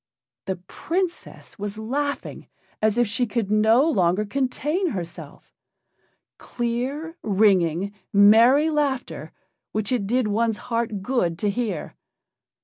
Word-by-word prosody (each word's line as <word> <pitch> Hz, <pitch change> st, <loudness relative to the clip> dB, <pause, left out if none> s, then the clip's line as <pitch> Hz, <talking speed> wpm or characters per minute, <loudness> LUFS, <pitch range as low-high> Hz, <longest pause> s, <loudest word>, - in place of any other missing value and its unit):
The 190 Hz, -, -2 dB
Princess 335 Hz, -, -5 dB
was 205 Hz, +1 st, -5 dB
laughing 280 Hz, +6 st, -3 dB, 0.3 s
as 215 Hz, +1 st, +2 dB
if 240 Hz, -, +4 dB
she 230 Hz, +4 st, 0 dB
could 210 Hz, -2 st, -2 dB
no 220 Hz, +7 st, +4 dB
longer 190 Hz, -, +2 dB
contain 275 Hz, -, -1 dB
herself. 175 Hz, -, -8 dB, 0.9 s
Clear, 260 Hz, +8 st, -3 dB
ringing, 195 Hz, -3 st, +2 dB, 0.2 s
merry 230 Hz, +9 st, +6 dB
laughter, 285 Hz, -4 st, -2 dB, 0.4 s
which 215 Hz, 0 st, -2 dB
it 230 Hz, -6 st, 0 dB
did 245 Hz, +1 st, +1 dB
one's 220 Hz, +1 st, 0 dB
heart 230 Hz, -4 st, -3 dB
good 190 Hz, -8 st, 0 dB
to 205 Hz, +2 st, 0 dB
hear. 210 Hz, -7 st, -3 dB
225 Hz, 115 wpm, -23 LUFS, 200-260 Hz, 0.9 s, merry